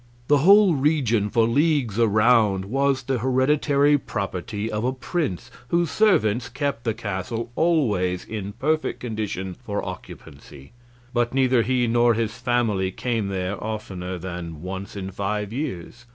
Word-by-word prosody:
The 145 -1 +5
whole 195 +4 +6
region 130 -8 +1
for 115 -1 +2
leagues 135 -4 +1
around 110 -3 +3
was 135 +4 0
the 130 0 -1
hereditary 140 +3 +2
property 105 -2 -4
of 105 +1 -2
a 130 +1 0
prince, 135 - -3 0.2
whose 170 +2 +1
servants 120 - +2
kept 135 -1 -3
the 115 -2 0
castle 110 +4 -4
always 105 - +1
in 105 -2 -5
perfect 155 +7 -1
condition 105 -5 -4
for 100 0 -3
occupancy, 70 -6 -11 0.4
but 120 +1 0
neither 130 -2 +3
he 125 +2 +1
nor 120 0 +3
his 115 0 -1
family 120 -6 0
came 115 0 -2
there 95 +1 -3
oftener 95 -4 -5
than 85 -3 -7
once 95 +2 -6
in 95 -1 -5
five 100 +2 -3
years. 120 - -5
115 Hz, 140 wpm, -23 LUFS, 100-130 Hz, 0.4 s, whole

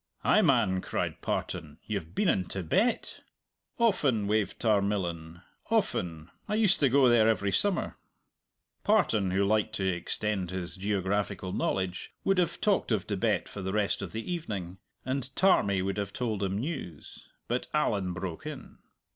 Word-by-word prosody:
"Ay, - - +5
man!" 95 0 +3
cried - - -3
Partan, - - -3
"you've 80 +4 -4
been - - +2
in 95 - +2
Tibet?" 100 - 0 0.6
"Often," 145 - +2
waved 105 0 0
Tarmillan, 95 -6 0 0.3
"often! 80 -2 -1 0.2
I 210 - +1
used 215 -3 +4
to 140 - +4
go 135 +1 +5
there 115 -2 +5
every 100 -3 +1
summer." 195 - +1 0.9
Partan, 115 - +3
who 95 +2 +2
liked 110 +1 +1
to 95 - -1
extend 95 +2 -1
his 90 -1 -4
geographical 100 -1 -1
knowledge, 95 -1 -2
would 195 -1 +2
have 170 -1 0
talked 205 -10 +1
of 105 -4 +1
Tibet 105 +1 0
for 100 - -7
the 95 0 -3
rest 105 -2 +1
of - - -5
the 110 +1 -5
evening 100 - -4 0.3
and 130 0 -2
Tarmie 100 - +3
would 95 +1 -2
have 100 -1 -3
told 110 -5 -2
him 95 0 -1
news 120 - -6 0.2
but 120 +1 -1
Allan 100 -11 +1
broke 90 -2 -5
in. - - -9
100 Hz, 155 wpm, -29 LUFS, 95-120 Hz, 0.9 s, Ay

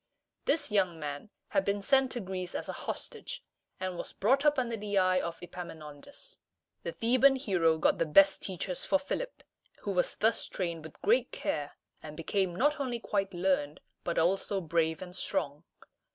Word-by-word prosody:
This 295 -5 +2
young 185 -5 +2
man 145 +5 -5 0.2
had 290 - +2
been 200 0 -1
sent 265 0 +4
to 245 - -2
Greece 185 -1 -4
as - - -3
a - - -3
hostage, - - -5 0.4
and 185 -1 -3
was - - -6
brought 265 +7 +3
up 295 -1 +5
under 240 -3 0
the 205 -1 -2
eye 185 -1 +4
of 170 - -4
Epaminondas. 170 - -8 0.4
The - - -3
Theban 255 +4 +4
hero 180 - +2
got 155 - +2
the 165 - +2
best 195 +5 +6
teachers 185 -1 -3
for 290 - +3
Philip, - - -4 0.4
who 200 - -2
was 180 -2 +1
thus 225 +1 +1
trained 170 -4 -3
with 160 - -12
great 465 +4 +3
care, - - -2 0.3
and 150 -1 -9
became 180 +2 0
not 295 - +2
only 255 -4 -1
quite 195 -3 -1
learned, 175 -5 +1 0.2
but 170 - -2
also 195 +4 +2
brave 165 -1 0
and 180 -1 -10
strong. 150 -3 -1
190 Hz, 175 wpm, -31 LUFS, 170-240 Hz, 0.4 s, best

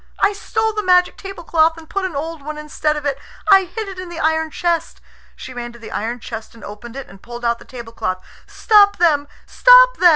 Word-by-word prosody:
I 405 - +3
stole 445 +2 -2
the 425 - -1
magic 360 -2 +3
tablecloth, 335 -4 0
and 325 -1 -12
put 390 +3 -2
an 360 -5 -5
old 320 +2 -4
one 300 +2 -7
instead 300 0 -2
of 295 - -6
it. 280 -1 -1 0.3
I 385 -1 +7
hid 420 +4 -6
it 380 -2 -8
in 370 -1 -7
the 345 - -8
iron 320 0 +1
chest." 345 0 -2 0.4
She 260 - -9
ran 240 -1 -6
to - - -13
the 230 - -11
iron 230 +3 -3
chest 225 0 -8
and 225 - -15
opened 230 +3 -10
it, 275 -1 -6
and 195 0 -16
pulled 240 0 -8
out 235 0 +1
the - - -15
tablecloth. 230 -7 -5 0.3
"Stop 410 -2 +4
them! 300 -4 +2 0.2
Stop - - +6
them!" 360 - +6
320 Hz, 225 wpm, -19 LUFS, 245-370 Hz, 0.4 s, I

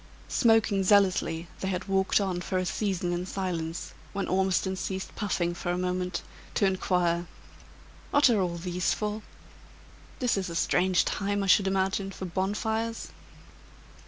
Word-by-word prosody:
Smoking 225 -5 +3
zealously 185 -4 +3
they 190 - -3
had 185 0 -2
walked 195 +1 +2
on 185 -3 -1
for 185 - -2
a 185 - 0
season 185 -2 -1
in 175 +1 -3
silence, 175 -4 -3 0.2
when 195 0 -2
Ormiston 190 0 +1
ceased 190 +1 -4
puffing 180 -4 -1
for 175 - -5
a 175 - -1
moment, 180 -1 -2 0.3
to 200 - +3
inquire: 180 -2 +1 0.8
"What 285 0 +5
are 230 -4 +3
all 175 -2 -1
these 175 0 -1
for? 210 0 -3 1.0
This 245 -5 +1
is 190 -2 -2
a 170 - -5
strange 180 +3 +2
time, 205 0 -1
I - - -1
should 195 +1 +5
imagine, 195 0 0
for 190 -1 -6
bonfires." 220 +5 -2
190 Hz, 150 wpm, -28 LUFS, 180-200 Hz, 1.0 s, What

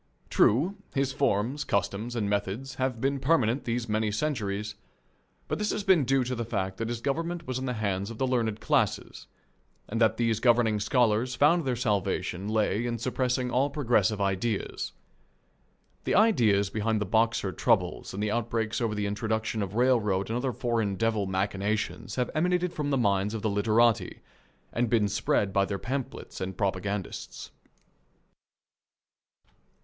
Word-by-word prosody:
True, 160 - +3 0.2
his 135 -1 +1
forms, 135 +1 0
customs, 100 +2 -1
and 110 -3 0
methods 105 +6 -2
have 130 -3 0
been 135 +2 0
permanent 130 -3 +2
these 120 0 -2
many 110 0 0
centuries, 105 -5 -2 0.7
but - - -2
this 210 0 0
has 210 - -1
been 185 -8 +4
due 135 +1 +2
to 125 +1 -3
the 120 -1 -2
fact 95 -4 -3
that 115 0 -3
his 120 -1 -4
government 165 +5 -2
was 130 0 -3
in 130 - -4
the 125 - -1
hands 100 -3 -2
of 115 - -8
the 130 - +1
learned 115 -4 0
classes, - - 0 0.6
and 115 +2 -3
that 110 -1 +4
these 115 -2 +1
governing 115 -3 +3
scholars 115 +2 +2
found 150 +5 +4
their 130 -2 0
salvation 100 -4 -1
lay 110 0 +1
in 120 -1 -2
suppressing 125 +1 -1
all 135 +4 +2
progressive 115 -7 +1
ideas. 100 +2 -2 1.1
The - - +1
ideas 110 - +4
behind 110 +1 0
the 105 - -1
Boxer 110 -1 +1
troubles 95 -4 0
and 100 +2 -4
the 105 - 0
outbreaks 115 0 -1
over 110 -2 0
the 105 0 -1
introduction 110 +1 -2
of 100 0 -4
railroad 110 -6 +2
and - - -1
other 130 +1 -1
foreign 115 -4 -1
devil 110 -2 0
machinations 100 +2 -2
have 125 -1 -1
emanated 180 +2 +1
from 150 -2 -2
the 140 - +2
minds 100 -2 +1
of 110 - -5
the 110 - +1
literati, 110 +2 +2 0.5
and 120 -1 0
been 110 -3 +3
spread 100 0 0
by 100 -1 +3
their 100 0 -2
pamphlets 130 +4 -5
and 95 0 -4
propagandists. 100 -1 -3
115 Hz, 160 wpm, -28 LUFS, 105-130 Hz, 1.1 s, been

